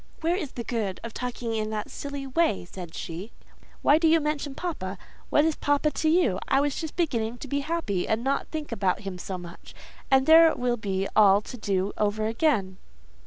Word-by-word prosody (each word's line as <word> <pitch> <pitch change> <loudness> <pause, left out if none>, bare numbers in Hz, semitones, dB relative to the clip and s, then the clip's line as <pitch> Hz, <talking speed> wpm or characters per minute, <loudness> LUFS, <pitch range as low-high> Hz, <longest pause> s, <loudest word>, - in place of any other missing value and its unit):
"Where 335 +2 +2
is 320 -8 -4
the 235 - -5
good 215 -6 -2
of 230 -1 -6
talking 245 -2 -4
in 215 -1 -1
that 215 -1 -4
silly 280 -1 -5
way?" 270 - +1
said 175 -2 -9
she. 175 +7 -6 0.5
"Why 295 +2 +5
do 330 - +3
you 325 +1 +5
mention 295 -2 -2
papa? 200 - -4 0.3
What 295 - +4
is 320 -2 +1
papa 290 +1 +1
to 315 - 0
you? 310 - +3
I 270 - +3
was 285 -1 0
just 320 -3 -5
beginning 240 -9 -1
to 275 - -8
be 280 +2 -1
happy, 280 - -2
and 220 +2 0
not 275 +1 0
think 310 -4 -5
about 195 -4 0
him 195 -3 -6
so 185 +1 -4
much; 175 -1 -11 0.3
and 265 0 +4
there 325 +1 +8
it 320 - 0
will 245 -1 0
be 195 -2 -2
all 205 -2 +7
to 250 - -9
do 200 -3 -1
over 215 +1 +1
again!" 220 -6 +1
240 Hz, 210 wpm, -26 LUFS, 200-300 Hz, 0.5 s, there